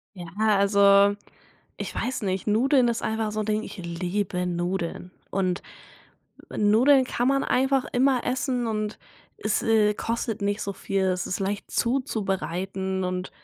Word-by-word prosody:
Ja, 175 -2 -8
also, 200 -1 +5 0.6
ich - - -5
weiß 255 +1 -2
nicht. 190 0 -2
Nudeln 245 +4 +3
ist 235 -1 -1
einfach 220 -1 -1
so 215 - -3
'n - - -3
Ding, 215 0 0
ich - - -9
liebe 180 +1 -2
Nudeln. 175 0 -3 0.2
Und 185 -2 0 0.9
Nudeln 250 +6 +4
kann 245 0 -1
man 275 0 +2
einfach 265 0 +2
immer 255 0 +2
essen 250 -1 -1
und 215 -1 -2 0.4
es, 215 - 0
äh, 215 -2 +3
kostet 225 0 -3
nicht 205 +1 -1
so 200 - -3
viel, 195 0 -2
es 185 0 -1
ist - - -3
leicht 200 +1 -3
zuzubereiten 190 - -1
und 180 0 -3
205 Hz, 145 wpm, -25 LUFS, 190-235 Hz, 0.9 s, also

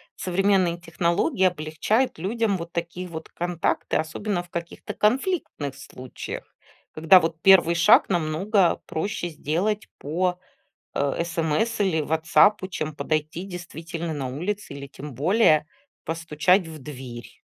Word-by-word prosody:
современные 185 -2 +1
технологии 175 - 0
облегчают 180 - +1
людям 205 +2 0
вот 170 -1 -7
такие 175 +2 -4
вот 160 -2 -8
контакты. 175 -1 -1
Особенно 175 +4 -2
в 175 - -19
каких-то 170 +4 -6
конфликтных 215 - 0
случаях, 130 -2 -8 0.5
когда 160 +4 +6
вот 165 -1 -3
1 180 -3 +6
шаг 170 - +6
намного 175 +2 +2
проще 175 +1 -3
сделать 175 +7 -1
по, 180 +4 -1 0.6
э, 140 +4 0
смс 170 +7 -1
или 185 -6 +2
"Ватсапу", 170 +6 +3
чем 155 -4 -4
подойти, 155 +3 -2
действительно, 170 -2 -6
на 140 -4 -3
улице 180 +7 -4
или, 140 0 -7
тем 140 0 -9
более, 155 - +3 0.4
постучать 165 +3 +1
в 160 -1 -9
дверь. 130 -4 -9
170 Hz, 125 wpm, -24 LUFS, 155-190 Hz, 0.6 s, когда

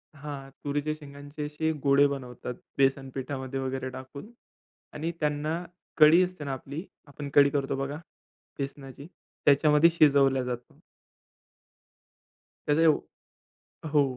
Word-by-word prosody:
हां. 140 -2 -7
तुरीच्या 145 +1 -1
शेंगांचे 145 +1 -9
अशे 155 +2 -1
गोळे 140 0 +5
बनवतात 125 -3 -5 0.2
बेसन 135 0 +2
पीठामध्ये 135 0 -4
वगैरे 130 0 -3
टाकून 130 - -10 0.6
आणि 160 +3 -3
त्यांना 150 +3 -1 0.3
कढी 155 +3 +8
असते 180 -4 -5
ना 140 - -3
आपली, 140 +5 -6 0.2
आपण 145 0 -7
कढी 140 0 +7
करतो 140 -1 -1
बघा 135 +2 -3 0.6
बेसनाची, 140 0 -7 0.4
त्याच्यामध्ये 150 +3 +6
शिजवल्या 135 -3 +5
जात. 125 -1 -5 1.9
त्याचं 150 +2 +3
ये 165 - +6 1.0
हो. 140 -4 +2
140 Hz, 115 wpm, -28 LUFS, 135-150 Hz, 1.9 s, कढी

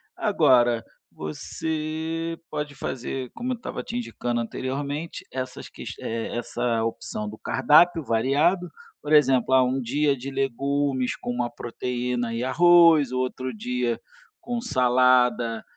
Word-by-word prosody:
Agora, 120 -2 +3 0.3
você 160 - -4
pode 150 -2 -4
fazer, 130 -1 -4
como 250 +2 -3
eu - - -3
estava 235 - -6
te 235 - -7
indicando 120 - -2
anteriormente, 140 +6 -4
essas 130 0 -6
ques - - -8
essa 115 0 -2
opção 105 -2 -4
do 110 - -9
cardápio 155 +5 +4
variado, 145 +10 +1 0.3
por 150 - -2
exemplo, 130 -3 +4
ah, 130 -1 +6
um 130 +1 0
dia 140 +3 +1
de 130 +3 -6
legumes 135 0 -1
com 120 - -5
uma 120 0 -1
proteína 120 0 -3
e 115 - -2
arroz, 165 0 +6
outro 130 0 -2
dia 125 +1 -1 0.4
com 240 0 -3
salada 125 - +2
130 Hz, 125 wpm, -25 LUFS, 120-150 Hz, 0.4 s, ah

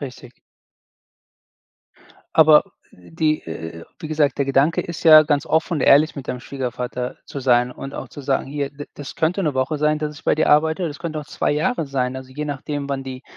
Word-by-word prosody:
Richtig. 130 -3 -10 2.0
Aber 155 -1 +7 0.3
die, 155 - -2
äh, 80 0 -7
äh, - - -10
äh - - -11 0.2
wie 155 - -6
gesagt, 150 -2 +1
der 140 - +2
Gedanke 135 +4 +2
ist 170 -2 -7
ja, 155 -1 +9
ganz 145 -1 0
offen 160 +2 +1
und 145 - -2
ehrlich 150 +5 +5
mit 140 - -8
deinem 125 - -3
Schwiegervater 125 -1 -4
zu 140 - -7
sein 125 -1 +3
und 135 +2 -8
auch - - -6
zu - - -10
sagen: 135 -1 -1
„Hier, 140 0 -3
d 145 0 -9
das 145 - -8
könnte 165 +4 0
'ne 150 -5 0
Woche 130 +3 -1
sein, 150 +1 +1
dass 150 0 -4
ich - - -15
bei - - +3
dir 155 - +1
arbeite 160 +4 +3
oder 170 - -1
es 145 - -10
könnten 155 -3 -4
auch 150 - -7
2 - - -1
Jahre 155 - 0
sein. 130 -2 -2
Also, 130 0 -9
je 150 +3 -4
nachdem, 145 0 -4
wann 135 -1 -2
die 130 0 -7
145 Hz, 220 wpm, -21 LUFS, 130-155 Hz, 2.0 s, ja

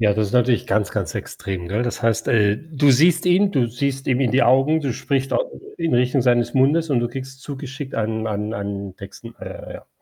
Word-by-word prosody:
Ja, 105 -2 +4
das 105 0 0
ist - - -8
natürlich 125 -1 +2
ganz, 105 +1 0
ganz - - -3
extrem, 90 -3 -5
gell? 110 +5 -1
Das 120 - -4
heißt, 115 0 +1
äh 105 -3 +3
du 145 0 +1
siehst 170 +6 +4
ihn, 195 +3 +3
du 125 -5 +1
siehst 135 +3 -3
ihm 125 -1 +2
in 130 -3 +1
die 135 +2 +4
Augen, 135 +6 +4
du 135 -5 -2
sprichst 135 +1 -2
auch - - +1 0.3
in 165 -5 0
Richtung 125 +2 +2
seines 120 -1 +2
Mundes 150 +5 +2
und 135 - +3
du 120 - 0
kriegst 130 +1 -8
zugeschickt 135 -1 -7
einen 110 0 -2
einen 105 +1 -3
einen 100 -2 -5
Texten 110 +4 -11
äh, - - -9
ja. - - -11
125 Hz, 220 wpm, -21 LUFS, 110-140 Hz, 0.3 s, Ja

